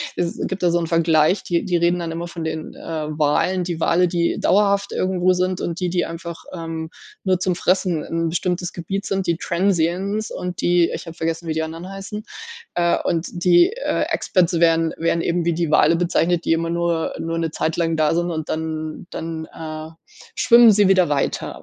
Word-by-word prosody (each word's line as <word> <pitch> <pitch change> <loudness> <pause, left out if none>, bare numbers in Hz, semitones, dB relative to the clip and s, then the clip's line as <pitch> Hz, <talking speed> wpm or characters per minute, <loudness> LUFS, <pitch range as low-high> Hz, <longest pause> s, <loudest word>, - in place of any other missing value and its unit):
es 170 -1 -2
gibt 190 0 -5
da 175 - +4
so 170 - +2
'n 165 - -2
Vergleich, 165 +2 +3
die 170 -1 -1
die 180 - 0
reden 170 +1 +2
dann 170 -1 -4
immer 170 +1 -4
von 170 -1 -7
den, 160 0 -4
äh, - - -13 0.4
Walen. 160 +5 +1
Die 170 -2 -3
Wale, 180 +1 +3
die 170 0 0
dauerhaft 200 0 +2
irgendwo 185 0 +1
sind, 185 0 0
und 170 0 -3
die, 180 -1 -1
die 175 0 0
einfach, 170 0 -7
ähm, 165 -2 -5 0.3
nur 185 -2 +1
zum 185 -1 0
Fressen 180 -3 +1
'n 165 0 -2
bestimmtes 175 +1 -2
Gebiet 195 +4 -4
sind, 195 -1 -2
die 170 -1 +1
Transiens 190 +4 0
und 180 -1 -5
die 175 -1 +3
ich - - -5
habe 165 - -8
vergessen, 165 +1 -3
wie 160 - -1
die 160 0 -1
anderen 165 +3 -7
heißen, 195 +2 -7 0.5
äh, 170 -1 +2
und 165 0 -1 0.2
die, 175 - +5
äh, - - -1
Expats 175 -3 +1
werden 165 -1 +3
werden 165 +1 0
eben 170 +1 0
wie 170 - +2
die 165 -1 -1
Wale 155 +2 +5
bezeichnet, 175 0 +1
die - - +3
immer 165 0 -1
nur 170 -1 -1
nur 165 0 -3
'ne 165 -1 -1
Zeit 160 +1 -1
lang 165 -1 +1
da 155 0 +2
sind 175 +1 0
und 160 -1 -4
dann 155 +1 -4
dann, 160 -1 -5
äh, 155 -1 -7 0.5
schwimmen 235 -2 +7
sie 205 -1 +4
wieder 185 -4 +4
weiter, 145 -2 -2
170 Hz, 205 wpm, -21 LUFS, 165-180 Hz, 0.5 s, schwimmen